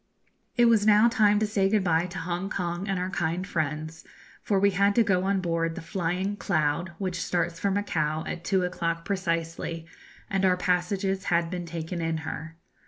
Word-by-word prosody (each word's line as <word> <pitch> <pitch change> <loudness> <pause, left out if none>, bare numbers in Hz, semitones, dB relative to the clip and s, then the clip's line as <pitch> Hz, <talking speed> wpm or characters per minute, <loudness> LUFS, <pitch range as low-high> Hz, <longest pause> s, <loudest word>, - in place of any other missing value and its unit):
It 240 - +5
was 230 -3 +5
now 215 +2 +7
time 215 -4 +4
to 215 - +2
say 200 -2 +1
good 210 -1 +2
bye 170 -1 +2
to 180 +2 -8
Hongkong 175 +1 -3
and 195 - 0
to 180 - -1
our 185 - -3
kind 175 0 -1
friends, 155 -3 -3 0.4
for 200 -2 +1
we 200 +1 +4
had 200 +2 +2
to 235 - +5
go 190 -4 +1
on 195 -1 +1
board 165 -2 -1
the - - -6
'Flying 185 +4 -2
Cloud,' 170 -2 0
which 185 -2 -3
starts 175 -1 -1
for 200 - +1
Macao 160 -6 -1
at 170 - -5
two 190 -1 +1
o'clock 170 -2 -2
precisely, 165 -3 -2 0.4
and 195 -2 -1
our 185 -1 +4
passages 190 +2 0
had 170 -1 +1
been 175 -2 -4
taken 165 +1 -4
in 165 0 -1
her. 160 +1 -6
180 Hz, 190 wpm, -27 LUFS, 165-195 Hz, 0.4 s, now